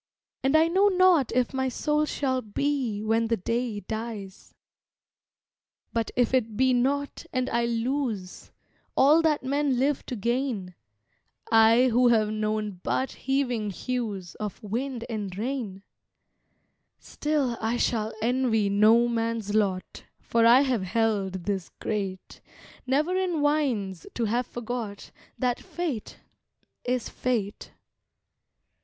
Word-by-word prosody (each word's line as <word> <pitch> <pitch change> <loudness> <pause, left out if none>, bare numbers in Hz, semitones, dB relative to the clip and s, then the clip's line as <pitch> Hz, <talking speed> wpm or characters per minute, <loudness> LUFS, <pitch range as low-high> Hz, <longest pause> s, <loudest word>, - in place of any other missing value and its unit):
And 270 +3 +2
I 320 +1 +5
know 380 +4 +4
not 370 - +4
if 250 0 +1
my 265 0 0
soul 300 +4 0
shall 260 -3 -1
be 235 -1 -2
When 225 +1 +1
the 230 0 +1
day 230 +1 -2
dies. 220 -2 -7 1.4
But 230 -1 0
if 245 0 +2
it 225 -5 +1
be 260 0 +4
not 280 +3 -1
and 255 0 -1
I 235 0 +1
lose 235 -5 -3 0.5
All 300 +5 +6
that 310 -4 +1
men 280 0 +1
live 275 +2 +1
to 250 - -3
gain 235 -4 -2 0.8
I 225 +3 +6
who 245 +2 +4
have 220 -3 +3
known 215 -2 -2
but 265 - -1
heaving 250 -5 -1
hues 205 -4 -4
Of 210 -1 -5
wind 235 +3 -3
and 205 -5 -4
rain 220 -5 -4 1.1
Still 295 -5 -1
I 225 +2 0
shall 220 -3 0
envy 235 -4 +2
no 220 +4 +5
man's 230 -3 -2
lot, 195 -4 -1
For 230 0 +2
I 245 +3 +7
have 255 -6 +1
held 195 -2 0
this 195 -4 -2
great, 195 -3 -4 0.5
Never 300 +8 +1
in 370 -4 0
whines 250 - 0
to 235 - 0
have 240 +3 0
forgot 235 -3 -6 0.3
That 250 -2 0
Fate 310 -11 -5 0.7
is 250 0 -1
Fate. 220 -5 -3
235 Hz, 125 wpm, -26 LUFS, 215-265 Hz, 1.4 s, I